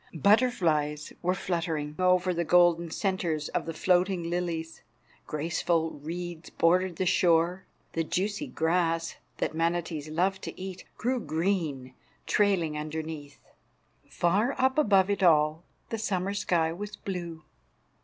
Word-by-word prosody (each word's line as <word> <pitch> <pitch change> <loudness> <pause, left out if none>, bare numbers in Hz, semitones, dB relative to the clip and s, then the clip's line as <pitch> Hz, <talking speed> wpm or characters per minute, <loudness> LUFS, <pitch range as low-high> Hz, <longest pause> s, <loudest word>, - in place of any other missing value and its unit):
Butterflies 160 - +2
were 180 +1 +1
fluttering 165 -5 -2
over 185 0 +3
the 170 0 0
golden 170 0 +4
centres 170 -5 -1
of - - -2
the 165 - -3
floating 180 -1 +1
lilies. 170 -2 -3 0.5
Graceful 165 +1 0
reeds 170 +2 -6
bordered 180 +1 +2
the 185 - -1
shore. 175 +1 +2 0.3
The 165 - 0
juicy 200 +5 -2
grass, 165 0 0 0.2
that - - -1
manatees 165 -2 -1
love 190 +5 0
to - - -7
eat, 185 0 -7
grew 250 +2 0
green, 160 - -2 0.3
trailing 190 -7 +2
underneath. 155 -2 -6 0.7
Far 200 +10 +1
up 260 +3 +2
above 200 -7 +4
it 200 - -1
all 155 -2 +4 0.3
the 225 - -3
summer 195 -2 -1
sky 170 -5 +1
was 205 +4 -6
blue. 170 -5 -6
170 Hz, 125 wpm, -28 LUFS, 160-190 Hz, 0.7 s, golden